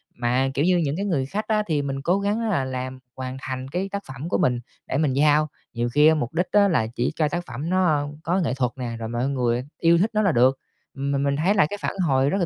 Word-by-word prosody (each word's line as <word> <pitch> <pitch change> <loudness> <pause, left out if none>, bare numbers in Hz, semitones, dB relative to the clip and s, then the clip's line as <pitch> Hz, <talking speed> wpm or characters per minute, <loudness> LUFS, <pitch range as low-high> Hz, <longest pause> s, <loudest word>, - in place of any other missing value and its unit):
Mà, 125 +2 +1
kiểu 145 - +1
như, 180 0 +4
những 150 -4 0
cái 200 +4 -2
người 150 -9 0
khách 210 +10 -3
á, 215 -1 +2
thì 155 -4 +1
mình 135 -1 -3
cố 180 +7 +1
gắng 210 +3 0
là 140 -10 +1
làm 130 0 -5 0.2
hoàn 130 0 -5
thành 130 -1 -5
cái 180 +7 -3
tác 200 - -3
phẩm 135 +5 -6
của - - +1
mình, 125 -9 +1 0.3
để 130 - -1
mình 145 -4 +1
giao, 150 +2 +4 0.3
nhiều 120 0 -1
khi 150 +2 +6
á, 160 - +5
mục 140 -4 -3
đích 175 +2 0
á, 205 -1 +5
là 150 - +1
chỉ 120 - 0
cho 155 -1 +2
tác 175 +3 -3
phẩm 135 +8 -5
nó, 185 0 +2
a, 150 -3 +3 0.2
có 175 +3 +1
nghệ 145 -8 0
thuật 125 -3 0
nè, 120 -3 -4
rồi 110 - -4
mọi 120 +3 -1
người 125 -2 0 0.2
yêu 170 0 +5
thích 200 +6 +2
nó 215 - +2
là 195 -4 +3
được, 130 +1 +4 0.4
mà 140 +1 -1
mình 140 0 +1
thấy 175 +7 +2
là 170 - +4
cái 205 - -4
phản - - -2
hồi 135 0 +3
rất 195 - 0
là 180 - +1
145 Hz, 280 wpm, -24 LUFS, 130-175 Hz, 0.4 s, khi